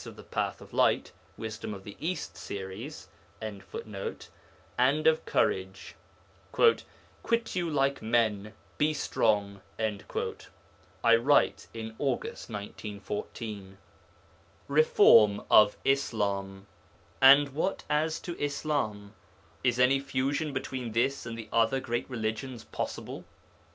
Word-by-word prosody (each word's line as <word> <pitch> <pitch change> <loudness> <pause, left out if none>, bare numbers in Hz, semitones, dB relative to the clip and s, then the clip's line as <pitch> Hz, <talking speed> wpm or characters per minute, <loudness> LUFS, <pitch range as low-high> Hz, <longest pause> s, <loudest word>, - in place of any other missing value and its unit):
of - - -10
The - - -12
Path - - -3
of - - -14
Light - - +2 0.3
(Wisdom 110 -1 -5
of 95 - -11
the 100 - -9
East 180 +4 -3
series).] 100 +9 -7 0.3
and 105 -3 -6 1.4
of 160 0 +3
courage; 95 +1 -1 0.6
'quit 235 - 0
you 175 -2 0
like 140 -2 +1
men, 110 -2 +1 0.3
be 155 +1 +2
strong.' 100 -7 0 1.4
(I 115 -1 +7
write 140 +5 +2
in 110 -1 -7
August 135 -3 -2
1914.) 105 -1 -6 0.9
REFORM 115 -8 +6
OF 105 -1 +7
ISLAM 100 -7 0 0.6
And 140 +2 +8
what 160 +8 -2
as 155 +2 0
to 175 - -5
Islam? 135 -9 -2 0.5
Is 125 -1 +2
any 130 +2 +5
fusion 140 +3 -1
between 130 -3 -4
this 120 +2 0
and 115 0 -5
the 115 -1 -7
other 115 +3 +3
great 120 -1 -3
religions 115 +1 -4
possible? - - -5
115 Hz, 110 wpm, -29 LUFS, 105-140 Hz, 1.4 s, And